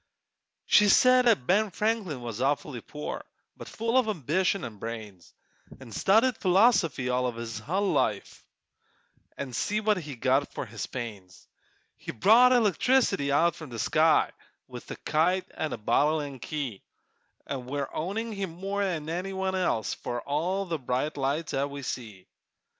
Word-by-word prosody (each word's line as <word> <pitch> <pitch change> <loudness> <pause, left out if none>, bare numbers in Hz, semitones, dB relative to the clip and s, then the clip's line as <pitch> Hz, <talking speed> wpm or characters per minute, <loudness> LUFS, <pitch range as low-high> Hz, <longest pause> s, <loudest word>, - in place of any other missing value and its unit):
She 210 -1 +5
said 255 +4 +5
'at 210 - +3
Ben 210 +6 +3
Franklin 195 - -2
was 115 -1 -5
awfully 140 -2 -1
poor, 150 +5 -6 0.3
But - - -10
full 230 +3 +1
of 250 - 0
ambition 185 - 0
an' 110 -3 -8
brains; 105 -5 -8 0.5
An' 130 -3 -12
studied 220 - +3
philosophy 180 - +3
all 125 0 +1
his 115 -1 -6
hull 190 - -1
life, - - -1 0.9
An' 135 -3 -5
see 210 - 0
what 215 -1 +2
he 150 -6 -6
got 130 +4 +1
for - - -3
his 115 -1 -6
pains! 105 -7 -8 0.5
He - - -6
brought 230 - +6
electricity 225 - +2
out 170 +4 +2
of 155 - -8
the 120 - -7
sky, - - +3 0.4
With - - -10
a - - -5
kite 180 +4 +1
an' 155 - -3
a - - -3
bottle 150 +8 +2
an' 140 -3 -6
key, 135 -8 -5 0.6
An' 130 -3 -5
we're 140 +1 -2
owing 210 +8 -3
him 195 -2 -3
more'n 190 -3 -2
any 180 +4 -3
one 190 0 -2
else 180 - 0
For 120 0 -4
all 175 +7 -1
the 165 -4 -3
bright 130 +4 -2
lights 145 +4 -2
'at 140 +1 0
we 140 0 -7
see. 110 -7 -6
155 Hz, 160 wpm, -27 LUFS, 125-195 Hz, 0.9 s, brought